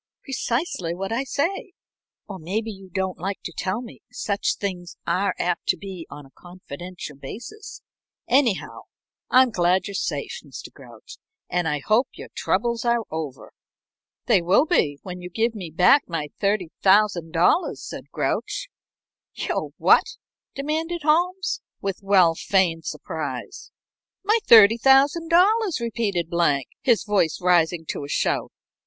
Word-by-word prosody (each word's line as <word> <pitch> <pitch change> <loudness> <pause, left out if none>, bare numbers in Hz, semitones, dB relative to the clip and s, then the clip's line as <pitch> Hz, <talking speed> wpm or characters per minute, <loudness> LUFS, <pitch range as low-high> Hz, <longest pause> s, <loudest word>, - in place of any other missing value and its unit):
"Precisely 240 - -2
what 195 +3 -4
I 235 +4 0
say 350 - -2 0.5
or 195 -2 -7
maybe 210 +7 -3
you 195 -2 -12
don't 190 0 -3
like 195 +3 -3
to 175 - -6
tell 190 +6 -2
me 235 - -12
such 200 -1 -1
things 180 -3 -5
are 195 +1 0
apt 175 -1 -2
to 185 - +2
be 185 -2 -8
on 145 0 -10
a 135 - -19
confidential 175 -2 -9
basis. 240 - -9 0.4
Anyhow, 250 -5 +1 0.4
I'm 255 -1 +5
glad 180 -1 +2
you're 200 - -6
safe, 195 - -3
Mr. - - -10
Grouch, - - -14 0.3
and 175 -2 0
I 150 -2 -1
hope 220 +5 +3
your - - -10
troubles 235 -1 0
are 235 -1 +1
over." 155 -4 -6 0.7
"They - - +4
will 185 - +4
be 150 - +1
when 180 -1 -7
you 180 - -7
give 225 +5 0
me 190 -6 -7
back 180 - +4
my 160 -4 -3
$30,000," 190 - +2
said - - -9
Grouch. - - -2 0.7
"Your - - -2
what?" - - +4 0.4
demanded 320 +4 -2
Holmes, 355 +5 +1 0.2
with 195 -1 -3
well 190 -4 +4
feigned 170 -2 +1
surprise. - - -6 0.5
"My 430 +4 +3
$30,000," 295 - +5
repeated 220 -7 -1
Blank, 150 -6 +1
his 235 -4 +3
voice 200 -6 +1
rising 175 -2 +2
to - - -3
a 140 - -8
shout. - - 0
195 Hz, 135 wpm, -23 LUFS, 175-250 Hz, 0.7 s, I'm